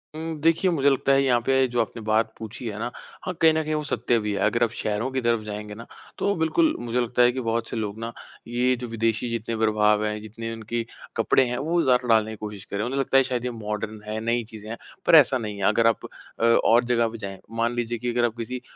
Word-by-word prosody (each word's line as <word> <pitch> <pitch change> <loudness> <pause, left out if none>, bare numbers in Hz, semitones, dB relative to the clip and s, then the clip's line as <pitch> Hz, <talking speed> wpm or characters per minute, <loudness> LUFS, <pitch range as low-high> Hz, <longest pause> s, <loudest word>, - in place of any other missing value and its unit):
उम, 160 0 -4
देखिए 165 +3 +3
मुझे 140 -3 +3
लगता 135 0 +1
है 135 0 +4
यहाँ 125 -3 +3
पे 135 0 +3
जो 120 -1 0
आपने 115 +1 -5
बात 110 +1 +1
पूछी 110 +2 -8
है 105 -2 -5
ना, 120 +2 -3 0.3
हाँ 185 - -2
कहीं 160 -1 +6
न 160 0 0
कहीं 155 0 -2
वो 150 0 -1
सत्य 120 -4 0
भी 105 -1 -2
है। 100 - -2
अगर 115 +3 +2
आप 115 - +2
शहरों 110 +4 -1
की 130 -1 -1
तरफ 115 -1 +2
जाएँगे 105 0 -6
ना, 115 +2 -10 0.3
तो 200 - +1
बिल्कुल 310 - +2
मुझे 120 +1 -1
लगता 120 +1 +1
है 120 - +6
कि 130 - -4
बहुत 115 0 -1
से - - -5
लोग 110 0 -4
ना 115 +1 -4 0.4
ये 125 +2 +1
जो 125 - -5
विदेशी 115 +1 -1
जितने 115 0 -3
प्रभाव 105 -1 +3
हैं, 105 0 -2
जितने 115 +1 -7
उनके 115 +1 -4 0.3
कपड़े 130 - +3
हैं 125 - -2
वो 170 +5 +1
ज़्यादा 125 -1 +2
डालने 110 -1 +3
की 110 - -6
कोशिश 105 -2 -7
कर - - -7
रहे 105 - -1
हैं। 125 - -3
उन्हें 135 - -1
लगता 135 0 +2
है 135 - +6
शायद 125 -2 -2
ये 125 - -1
मॉडर्न 105 -1 -5
है, 110 +1 -3
नई 120 +1 +1
चीज़ें 110 -1 -10
हैं, 115 - -5 0.3
पर - - +6
ऐसा 135 -4 +6
नहीं 105 -3 -5
है। 100 - -5
अगर 115 +2 +3
आप 115 - +1 0.3
अ, - - -2
और 115 0 +4
जगह 120 -1 +2
पे 115 +1 -7
जाएँ 100 -3 -7 0.2
मान 115 +1 +1
लीजिए 120 0 -2
कि 120 +2 -3
अगर 120 0 +2
आप 115 -1 -2
किसी 125 +2 -5
115 Hz, 265 wpm, -25 LUFS, 110-125 Hz, 0.4 s, कहीं